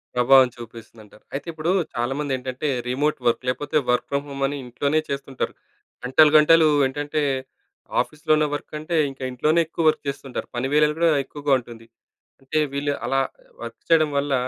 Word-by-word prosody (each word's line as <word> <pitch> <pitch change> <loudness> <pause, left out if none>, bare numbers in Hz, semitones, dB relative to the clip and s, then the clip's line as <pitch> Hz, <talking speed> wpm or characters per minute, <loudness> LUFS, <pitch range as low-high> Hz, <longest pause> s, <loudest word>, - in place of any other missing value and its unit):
ప్రభావం 130 +1 +6
చూపిస్తుదంటారు. 115 -2 -13
అయితే, 140 - -5
ఇప్పుడు 160 +2 -2 0.2
చాలామంది 135 +4 -2
ఏంటంటే, 130 +3 -4 0.2
రిమోట్ 145 +4 0
వర్క్ 120 +2 +1
లేకపోతే 145 +4 -1
వర్క్ 125 - 0
ఫ్రమ్ 140 0 -1
హోమ్ 140 0 -4
అని 145 +1 -4
ఇంట్లోనే 140 +5 0
చేస్తుంటారు. 135 -1 -4 0.5
గంటలు, 150 +4 +5
గంటలు 160 +1 +6 0.2
ఏంటంటే, 145 +3 -3 0.8
ఆఫీస్‌లోనే 155 0 0
వర్క్ 145 - -9
అంటే, 160 +2 -2
ఇంక 135 - -15
ఇంట్లోనే 155 +6 +1
ఎక్కువ 165 0 -3
వర్క్ - - -2
చేస్తుంటారు. 135 -2 -6
పని 125 +2 -1
వేళలు 150 0 +3
కూడా 170 -1 +4
ఎక్కువగా 145 0 -1
ఉంటుంది. 115 -2 -13 0.5
అంటే, 135 +3 -1
వీళ్ళు 145 +1 -1
అలా 135 0 +2 0.4
వర్క్ - - -8
చేయడం 155 -2 +4
వల్ల 140 0 0
140 Hz, 155 wpm, -23 LUFS, 130-150 Hz, 0.8 s, ప్రభావం